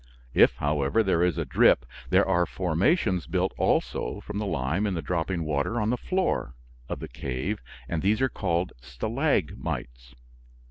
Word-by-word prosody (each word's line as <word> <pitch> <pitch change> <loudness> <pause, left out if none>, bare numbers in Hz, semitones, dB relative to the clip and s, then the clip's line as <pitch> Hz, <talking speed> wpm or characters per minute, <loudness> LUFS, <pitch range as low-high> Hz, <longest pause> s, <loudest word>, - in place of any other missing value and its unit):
If, - - +6
however, 75 +7 +1
there 95 -4 +2
is 90 -2 +2
a - - -1
drip, 65 - +4 0.2
there - - +4
are 90 -2 +2
formations 95 - +1
built - - 0
also 80 - 0
from 105 0 -5
the 105 - -2
lime 85 +6 0
in 95 - -1
the 80 - -2
dropping 85 +1 -1
water 75 +10 0
on 105 +1 +1
the - - +2
floor 180 - -1 0.3
of - - -3
the - - -5
cave, 70 - -4 0.3
and 80 +2 -2
these 105 +3 +2
are 130 - +3
called 90 -6 -1
stalagmites. 65 - -2
90 Hz, 165 wpm, -27 LUFS, 70-105 Hz, 0.3 s, If